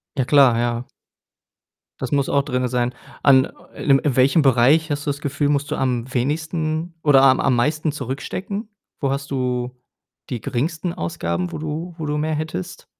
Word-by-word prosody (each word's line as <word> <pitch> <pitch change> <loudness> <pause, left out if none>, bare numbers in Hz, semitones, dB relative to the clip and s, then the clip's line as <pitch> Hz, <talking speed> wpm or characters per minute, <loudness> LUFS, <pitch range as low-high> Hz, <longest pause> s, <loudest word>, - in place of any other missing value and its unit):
Ja 130 - 0
klar, 135 -4 +5
ja. 120 0 -1 1.2
Das - - -4
muss 140 -1 +1
auch 140 - +3
drinne 125 -3 -1
sein. 125 0 -1 0.3
An 130 -2 +6 0.3
äh, - - -8
in 135 -1 +5
in 140 -3 -1
welchem 135 +5 +4
Bereich 140 +4 +4
hast 145 -1 -2
du - - -1
das 140 0 -2
Gefühl, 145 0 -1
musst 145 -1 0
du - - -1
am 125 -1 -1
wenigsten 155 +5 -1
oder 145 -3 +6
am 130 -1 +5
am 135 -2 +2
meisten 150 +5 +1
zurückstecken? 155 - -5 0.3
Wo 135 -2 +1
hast 140 0 -3
du 125 -1 -2 0.5
die 125 - -3
geringsten 165 +7 -2
Ausgaben, 85 +1 -3
wo - - -5
du 155 +3 -5
wo 160 - -4
du 150 0 -1
mehr 155 +1 -1
hättest? 155 - -5
140 Hz, 180 wpm, -21 LUFS, 125-155 Hz, 1.2 s, An